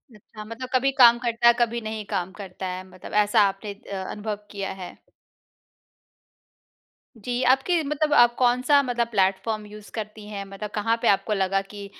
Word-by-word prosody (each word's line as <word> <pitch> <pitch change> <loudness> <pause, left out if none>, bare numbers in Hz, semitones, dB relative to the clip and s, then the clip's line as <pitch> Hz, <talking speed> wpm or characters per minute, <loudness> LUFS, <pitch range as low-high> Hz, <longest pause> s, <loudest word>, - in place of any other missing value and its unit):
अच्छा 215 +1 -12
मतलब 230 +4 -7
कभी 270 +2 +3
काम 240 -3 +7
करता 235 -1 +1
है, 235 - +8
कभी 235 0 0
नहीं 220 -1 -5
काम 185 -2 -3
करता 190 -1 -7
है? 185 0 -5
मतलब 185 -1 -12
ऐसा 210 +2 +3
आपने 200 +1 -5
अ, 195 -1 -7
अनुभव 210 0 -4 0.2
किया 195 -1 -4
है। 180 - -9 2.2
जी, 245 +3 -3
आपके 270 +7 +3
मतलब 300 +1 0
आप 240 0 +6
कौन-सा 255 +3 +3
मतलब 240 -2 -1
प्लेटफॉर्म 205 0 0
यूज़ 210 0 -12
करती 215 -1 -6
हैं? 205 -1 -5
मतलब 195 +2 -7
कहाँ 225 +2 +1
पे - - +1
आपको 195 +2 +2
लगा 195 -1 +1
कि 200 +1 -10
215 Hz, 170 wpm, -24 LUFS, 200-240 Hz, 2.2 s, है